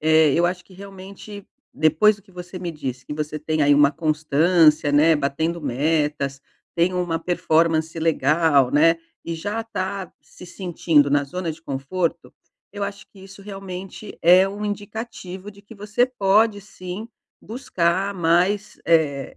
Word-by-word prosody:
eh, 155 Hz, -1 st, +4 dB
eu 170 Hz, +1 st, +3 dB
acho 180 Hz, 0 st, -4 dB
que, -, -, -20 dB
realmente, 195 Hz, +1 st, -11 dB, 0.3 s
depois 160 Hz, +8 st, +3 dB
do 200 Hz, -, -21 dB
que 195 Hz, -, -23 dB
você 180 Hz, +1 st, -8 dB
me 175 Hz, -1 st, -4 dB
disse, 130 Hz, -5 st, -6 dB
que -, -, -7 dB
você 150 Hz, 0 st, -4 dB
tem 155 Hz, 0 st, -1 dB
aí 145 Hz, 0 st, +5 dB
uma 145 Hz, -1 st, +5 dB
constância, 155 Hz, 0 st, +2 dB
né, 155 Hz, +3 st, +5 dB
batendo 160 Hz, +4 st, -2 dB
metas, 145 Hz, 0 st, -1 dB, 0.3 s
tem 175 Hz, +2 st, +1 dB
uma 175 Hz, -2 st, -1 dB
performance 165 Hz, -2 st, +1 dB
legal, 155 Hz, -3 st, +2 dB
né, 165 Hz, +3 st, +4 dB, 0.3 s
e 165 Hz, -, -4 dB
já 205 Hz, +7 st, -3 dB
tá 190 Hz, -3 st, -5 dB
se 180 Hz, -, -14 dB
sentindo 165 Hz, -6 st, +1 dB
na 145 Hz, 0 st, +2 dB
zona 175 Hz, +4 st, -4 dB
de 160 Hz, -, -14 dB
conforto. 160 Hz, +4 st, -3 dB, 0.4 s
Eu 205 Hz, 0 st, -3 dB
acho 200 Hz, 0 st, -7 dB
que 200 Hz, -, -19 dB
isso 195 Hz, +1 st, -13 dB
realmente 195 Hz, 0 st, -8 dB
é 180 Hz, +3 st, +6 dB
um 205 Hz, +1 st, -6 dB
indicativo 205 Hz, -2 st, -6 dB
de 200 Hz, -1 st, -17 dB
que 215 Hz, +2 st, -14 dB
você 210 Hz, +5 st, 0 dB
pode, 210 Hz, -2 st, +2 dB
sim, 190 Hz, +2 st, -8 dB, 0.3 s
buscar 200 Hz, -6 st, -1 dB
mais, 180 Hz, +4 st, +1 dB
eh 150 Hz, -5 st, +1 dB
175 Hz, 155 wpm, -22 LUFS, 155-195 Hz, 0.4 s, é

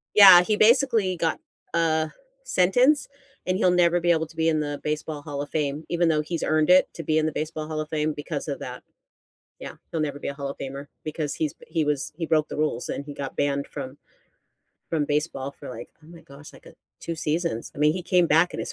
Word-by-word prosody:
Yeah. 190 Hz, -4 st, +10 dB
He 210 Hz, +4 st, 0 dB
basically 225 Hz, -4 st, +3 dB
got 165 Hz, -1 st, -1 dB, 0.3 s
a 160 Hz, -2 st, +1 dB, 0.3 s
sentence, 255 Hz, -, +3 dB, 0.4 s
and 185 Hz, 0 st, 0 dB
he'll 185 Hz, -, +3 dB
never 175 Hz, -1 st, +3 dB
be 175 Hz, 0 st, +2 dB
able 160 Hz, -1 st, +2 dB
to 160 Hz, +1 st, -17 dB
be 160 Hz, 0 st, +1 dB
in 155 Hz, -1 st, +1 dB
the 145 Hz, -1 st, -4 dB
Baseball 150 Hz, 0 st, -3 dB
Hall 145 Hz, -1 st, -5 dB
of 145 Hz, -, -6 dB
Fame 150 Hz, 0 st, -2 dB
even 170 Hz, 0 st, +2 dB
though 155 Hz, -1 st, +2 dB
he's 165 Hz, +2 st, -4 dB
earned 155 Hz, 0 st, +1 dB
it 185 Hz, -, +6 dB
to 165 Hz, -, -7 dB
be 155 Hz, +1 st, +1 dB
in 155 Hz, -, 0 dB
the 155 Hz, -, -1 dB
Baseball 155 Hz, 0 st, -4 dB
Hall 155 Hz, -1 st, -4 dB
of 155 Hz, -, -7 dB
Fame 155 Hz, -1 st, -1 dB
because 145 Hz, -, -5 dB
of -, -, -3 dB
that. -, -, -7 dB, 0.8 s
Yeah. -, -, -7 dB, 0.2 s
He'll 165 Hz, -, -2 dB
never 145 Hz, -2 st, -2 dB
be -, -, -5 dB
a 140 Hz, -, -4 dB
Hall 140 Hz, -1 st, -5 dB
of -, -, -9 dB
Famer 140 Hz, +1 st, -6 dB, 0.2 s
because 155 Hz, -1 st, -3 dB
he's 155 Hz, -2 st, -2 dB
he 160 Hz, -, -1 dB
was 145 Hz, -2 st, -2 dB
he 165 Hz, -1 st, -3 dB
broke 155 Hz, -1 st, +2 dB
the -, -, -6 dB
rules 150 Hz, -5 st, -1 dB
and 140 Hz, -, -4 dB
he 145 Hz, -, -7 dB
got 140 Hz, -1 st, -6 dB
banned 140 Hz, 0 st, 0 dB
from 135 Hz, -1 st, -7 dB, 0.9 s
from 155 Hz, -3 st, 0 dB
baseball 145 Hz, -2 st, -2 dB
for, -, -, -11 dB
like, 125 Hz, -, -8 dB, 0.2 s
oh -, -, -17 dB
my 170 Hz, 0 st, -13 dB
gosh, 140 Hz, +2 st, -14 dB
like, -, -, -18 dB
uh, -, -, -12 dB, 0.3 s
2 170 Hz, -, -4 dB
seasons. 160 Hz, -5 st, -2 dB
I -, -, -13 dB
mean, 150 Hz, +1 st, +3 dB
he 185 Hz, -, -4 dB
came 180 Hz, 0 st, +3 dB
back 165 Hz, +3 st, +3 dB
in -, -, -6 dB
his -, -, -4 dB
155 Hz, 235 wpm, -25 LUFS, 145-170 Hz, 0.9 s, Yeah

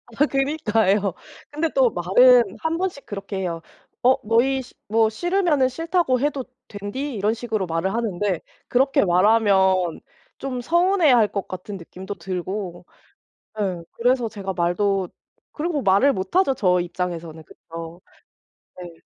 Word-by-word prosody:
아 290 Hz, -, +4 dB
그니까요. 225 Hz, -, +1 dB, 0.4 s
근데 310 Hz, +2 st, -1 dB
또 265 Hz, -3 st, +5 dB
말은 230 Hz, +4 st, +4 dB
1 320 Hz, +1 st, -1 dB
번씩 360 Hz, -6 st, -3 dB
그렇게 195 Hz, -1 st, -6 dB
해요. 170 Hz, -3 st, -3 dB, 0.4 s
"어 255 Hz, +1 st, +6 dB
너희 255 Hz, +5 st, +2 dB
시 245 Hz, -, -14 dB
뭐 220 Hz, +1 st, +3 dB
싫으면은 345 Hz, -, +1 dB
싫다고 330 Hz, -1 st, 0 dB
해도 280 Hz, -2 st, -1 dB, 0.2 s
된디." 205 Hz, +8 st, -5 dB
이런 210 Hz, +1 st, +1 dB
식으로 225 Hz, -4 st, -3 dB
말을 170 Hz, +3 st, -2 dB
하는데 205 Hz, -5 st, -1 dB, 0.3 s
그렇게 265 Hz, 0 st, +3 dB
말하면 190 Hz, -2 st, +3 dB, 0.4 s
좀 255 Hz, -2 st, -4 dB
서운해할 335 Hz, -, +4 dB
것 200 Hz, -1 st, -4 dB
같은 185 Hz, +2 st, -7 dB
느낌도 185 Hz, +3 st, -8 dB
들고 185 Hz, 0 st, -5 dB, 0.8 s
예 185 Hz, -4 st, -2 dB
그래서 245 Hz, -1 st, +1 dB
제가 195 Hz, -3 st, -5 dB
말도 185 Hz, +2 st, 0 dB, 0.4 s
그리고 310 Hz, -2 st, -2 dB
말을 200 Hz, +8 st, +4 dB
못하죠 270 Hz, -, +1 dB
저 180 Hz, -5 st, +2 dB
입장에서는, 170 Hz, -2 st, -5 dB
그쵸. 165 Hz, +2 st, -10 dB, 0.8 s
네. 175 Hz, -2 st, -11 dB
210 Hz, 275 characters per minute, -22 LUFS, 185-265 Hz, 0.8 s, 어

